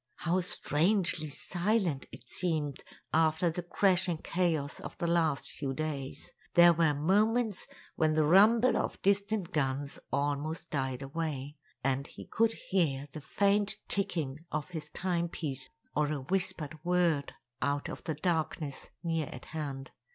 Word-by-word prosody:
How 175 +2 +1
strangely 170 -1 +2
silent 175 -1 0
it - - -12
seemed 155 -6 -2 0.3
after 160 +2 +3
the 180 - -3
crashing 180 -1 +2
chaos 160 -4 -1
of - - -8
the - - -2
last 165 -4 +1
few 135 -2 -3
days! 145 -3 -4 0.2
There 175 0 +8
were 160 -3 +3
moments 210 +7 +2 0.3
when 155 -1 +3
the 155 -1 +4
rumble 220 +8 +6
of - - -2
distant 200 -1 +1
guns 140 -2 -1
almost 145 +4 -1
died 130 -2 -1
away, 145 -1 -4 0.3
and 135 +1 0
he - - -10
could 225 0 +2 0.2
hear 145 -7 +1
the 155 - -7
faint 200 +6 +2
ticking 160 -8 -1
of 150 +1 -2
his 155 -3 -6
timepiece 170 -7 -2 0.3
or 150 0 +2
a 145 -3 -2
whispered 160 -1 -1
word 175 -5 +1 0.3
out 140 +2 0
of - - -7
the 160 -3 -1
darkness 155 -3 -2
near 165 -3 0
at 125 - -9
hand. 140 -4 -4
160 Hz, 140 wpm, -31 LUFS, 145-180 Hz, 0.3 s, There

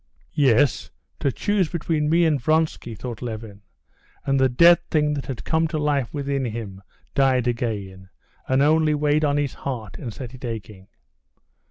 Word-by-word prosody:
'" - - -39 0.2
"Yes, 130 +4 +2 0.3
to 140 - +1
choose 190 - 0
between 155 -3 -1
me 170 +2 +4
and 150 -5 +1
Vronsky," 155 -5 0
thought 120 0 -7
Levin, 110 -4 -7 0.6
and 135 0 +2
the 130 0 +4
dead 170 +7 +6
thing 150 -1 +2
that 140 -2 -4
had 130 -4 -5
come 160 0 +1
to 155 0 -3
life 145 -6 0
within 140 -2 -2
him 110 -4 -6 0.3
died 130 -3 +2
again, 100 -6 -3 0.4
and 130 +1 +3
only 155 0 +3
weighed 150 +1 +1
on 145 -1 +2
his 145 -2 -1
heart 110 - -6
and 120 - -5
set 125 +2 -8
it 130 - -12
aching. 105 -5 -7
135 Hz, 170 wpm, -23 LUFS, 115-150 Hz, 0.6 s, dead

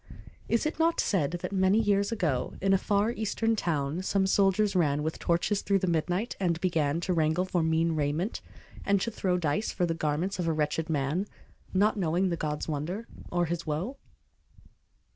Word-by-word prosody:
Is 230 - +2
it 310 - -2
not 330 +1 +2
said 165 -9 +1
that - - -3
many 190 +1 +3
years 200 -1 +2
ago, 155 - -1
In 195 0 +2
a - - +6
far 205 +3 +1
Eastern 225 0 0
town, 155 -4 -1
some 190 0 +1
soldiers 195 +1 +2
ran 150 -4 +2
With 160 +1 -3
torches 175 +4 +1
through 200 - +2
the 190 - -1
midnight, 175 +6 -1
and 170 -4 0
began 165 -4 +1
To 180 - 0
wrangle 160 +2 +1
for 180 -2 0
mean 160 +1 +2
raiment, 155 - -1 0.4
and 200 0 +2
to 230 - -1
throw 185 -4 0
Dice 160 +4 0
for 180 - 0
the 165 - -1
garments 165 +5 -1
of 175 - -1
a 165 - +2
wretched 155 +1 -1
man, 155 +6 0 0.4
Not 210 +3 +2
knowing 180 +1 +1
the 170 - 0
God's 150 -2 -3
wonder, 170 +9 -3 0.2
or 175 0 +1
His 170 0 -4
woe? 175 - -2
180 Hz, 185 wpm, -28 LUFS, 160-200 Hz, 0.4 s, a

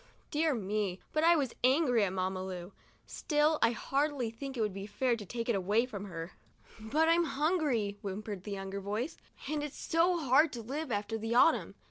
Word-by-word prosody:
Dear 310 -2 +2
me, 200 -3 -2
but 310 - +1
I 340 +1 +6
was 275 -6 0
angry 255 -3 +4
at 185 - -2
Mamma 185 0 -2
Lu! 180 0 -6 0.2
" - - -34
Still, 300 0 +1
I 230 - +5
hardly 275 0 -1
think 270 +3 -7
it - - 0
would 210 -3 0
be 195 +1 -6
fair 240 +3 +1
to 215 -3 -8
take 230 +2 -4
it 235 - +2
away 205 +4 +2
from 205 -5 -7
her." 165 -2 -6 0.3
" - - -22
But 290 +9 +1
I'm 335 +1 +4
hungry," 280 - 0
whimpered 200 -1 -5
the 210 - -7
younger 195 0 -4
voice, 215 - -3 0.3
"and 300 +1 -1
it's 295 -1 -6
so 345 +2 +2
hard 300 +1 +4
to 235 -2 -5
live 275 +4 -4
after 210 +2 -2
the 225 +2 -2
autumn. 290 +6 +4
235 Hz, 205 wpm, -32 LUFS, 205-295 Hz, 0.3 s, I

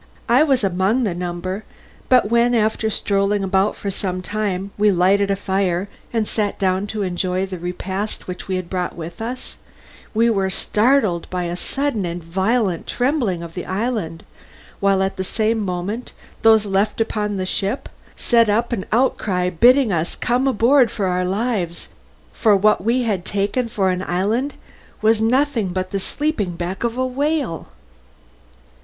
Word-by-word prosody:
I 245 +4 +5
was 270 -6 +3
among 195 +6 +1
the 205 -6 0
number, 180 +3 -4 0.5
but 250 -4 +4
when 235 +1 +3
after 220 0 +1
strolling 200 -1 +1
about 195 +2 +1
for 200 - -4
some 185 -1 -3
time 200 -2 -2
we 210 0 +3
lighted 195 +2 +3
a 200 - +2
fire 190 -1 -1 0.2
and 225 -2 0
sat 210 -2 -1
down 190 +1 0
to 210 0 -3
enjoy 185 0 -1
the 185 -2 -7
repast 190 +4 -4
which 180 -1 -6
we 190 - -1
had 185 -1 -3
brought 180 -1 -3
with 170 +3 -8
us, 245 +3 -6 0.6
we 230 +2 +4
were 195 -4 +1
startled 210 -3 +1
by 180 -1 -2
a 175 0 -3
sudden 270 +2 -2
and 175 -1 -4
violent 190 +2 0
trembling 245 - 0
of 165 -1 -8
the 180 - -6
island, 195 -5 -2 0.6
while 195 -1 +3
at 190 - -2
the 190 - -1
same 220 +3 0
moment 200 +4 -3 0.3
those 220 -1 +5
left 200 +2 0
upon 210 -2 -1
the 185 - -2
ship 200 +6 -2 0.3
set 230 -3 +3
up 230 +4 +1
an 190 -5 -3
outcry 195 -7 +1
bidding 240 - +5
us 165 0 -1
come 250 +3 0
on 265 - +1
board 245 +3 +5
for 200 - -2
our 180 0 0
lives, 195 -3 -2 0.4
since 205 -4 +3
what 210 -3 +4
we 240 +4 +2
had 205 -6 -1
taken 205 +6 -1
for 195 -4 +1
an 180 0 -2
island 210 +10 -1 0.4
was 220 0 +3
nothing 250 -1 +2
but 185 +1 -3
the 195 - -1 0.6
back 180 +4 -4
of 235 -1 0
a - - -10
sleeping 255 -1 -6
whale. 285 - -1
200 Hz, 170 wpm, -20 LUFS, 185-230 Hz, 0.6 s, I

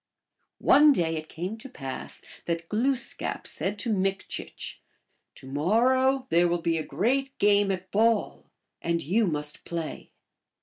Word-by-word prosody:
One 295 0 +6
day 165 -7 0
it 155 0 -6
came 185 +7 -4
to 270 - -9
pass 135 - -6 0.2
that 165 -1 -2
Glooskap 255 +4 -1
said 200 +2 -3
to 225 +1 -1
Mik 195 -1 0
chich, - - -6 0.3
" - - -47
To - - -13
morrow 250 - +2
there 170 +1 +4
will 170 -1 -1
be 165 -1 +1
a - - -2
great 255 - 0
game 205 -1 +4
at 185 -1 -3
ball, 225 +1 +1 0.3
and 170 0 0
you 205 +8 +2
must 150 -2 -3
play. 170 -2 -5
195 Hz, 155 wpm, -27 LUFS, 165-230 Hz, 0.3 s, One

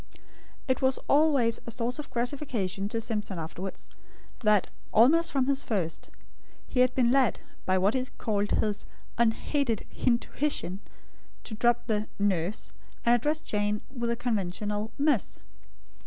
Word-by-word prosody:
It 260 - +1
was 260 0 +3
always 280 -6 +3
a - - -3
source 240 +3 -1
of 300 - -6
gratification 235 -7 -2
to 230 - -1
Simpson 210 -4 -3
afterwards, 175 +4 -6 0.5
that, 210 -3 +3 0.2
almost 325 +10 +5
from 270 -3 +2
the 275 +1 +2
first, 195 - -2 0.6
he 250 - -2
had 255 0 +4
been 245 -2 +3
led, 260 -3 +3 0.3
by 185 0 +3
what 195 +4 +3
he 260 - +1
called 205 -2 0
his 210 -1 0 0.3
"unHaided 235 +1 +1
HintuHition," 235 -5 0 0.6
to - - -7
drop 240 +2 +2
the 215 -2 0
"nurse," 190 - 0 0.3
and 235 - +5
address 295 +6 +1
Jane 210 0 -1
with 235 -1 -1
the 235 - +1
conventional 210 -2 -2
"miss." 285 -5 +1
230 Hz, 140 wpm, -28 LUFS, 205-260 Hz, 0.6 s, almost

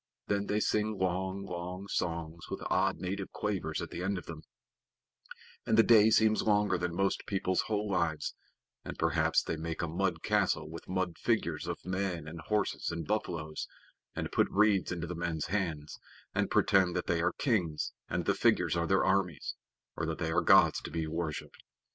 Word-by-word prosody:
Then 100 0 -1
they 105 - +1
sing 105 0 0
long, 95 +1 -1
long 90 +1 -5
songs 85 -2 -3
with - - -5
odd 95 +1 +2
native 95 +3 -4
quavers 95 -7 -2
at - - -8
the 85 - -5
end 100 +2 -1
of 90 - -7
them, 80 -2 -8 1.2
and 110 - +1
the 115 - +8
day 110 -2 +7
seems 110 0 +4
longer 105 -3 +2
than 90 -1 -2
most 95 +1 0
people's 95 -2 +1
whole 105 -1 -1
lives, 85 -5 0 0.5
and - - -7
perhaps - - +2
they 80 - -3
make 80 +1 -4
a - - 0
mud 85 0 -1
castle 95 -7 +1
with 80 +1 -9
mud 95 -2 -2
figures 85 -9 0
of 85 - -5
men 90 -3 -2
and 80 +1 -7
horses 105 -1 0
and 85 -1 -4
buffaloes, 80 -7 -2 0.5
and - - -3
put - - +2
reeds 105 -2 +3
into 85 -1 -3
the 85 - -5
men's 85 -2 -2
hands, 80 -7 -2 0.3
and - - 0
pretend 95 -3 +3
that 90 - -1
they 85 -1 +1
are 85 +1 +1
kings 90 - 0 0.2
and - - -1
the - - +3
figures - - +2
are 85 0 0
their 95 0 +3
armies, 95 -4 0 0.4
or 80 - -2
that 80 - -2
they 80 -1 -2
are - - +3
gods - - +5
to - - -7
be 80 -1 -2
worshiped. 80 -1 -4
90 Hz, 185 wpm, -31 LUFS, 85-100 Hz, 1.2 s, the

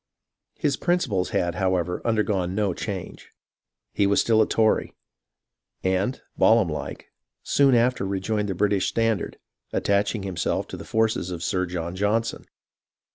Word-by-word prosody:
His 145 -3 0
principles 130 - 0
had, 85 -1 0
however, 90 -3 0
undergone 105 -5 0
no 100 -3 +1
change; 95 -1 -6 0.6
he 100 - +2
was 100 - +3
still 110 -1 +4
a 110 - +3
Tory, 110 -1 +1 0.9
and, 95 +7 0 0.2
Balaam 110 -5 +5
like, 75 - -6 0.3
soon 140 -2 +4
after 120 -1 +2
rejoined 100 +2 -1
the 95 - -2
British 100 0 +1
standard, 115 -2 0 0.3
attaching 100 +1 0
himself 95 -3 -2
to - - -6
the - - -9
forces 110 -4 0
of 85 -2 -5
Sir 90 -1 0
John 85 0 -4
Johnson. 110 +4 0
100 Hz, 135 wpm, -25 LUFS, 95-110 Hz, 0.9 s, Balaam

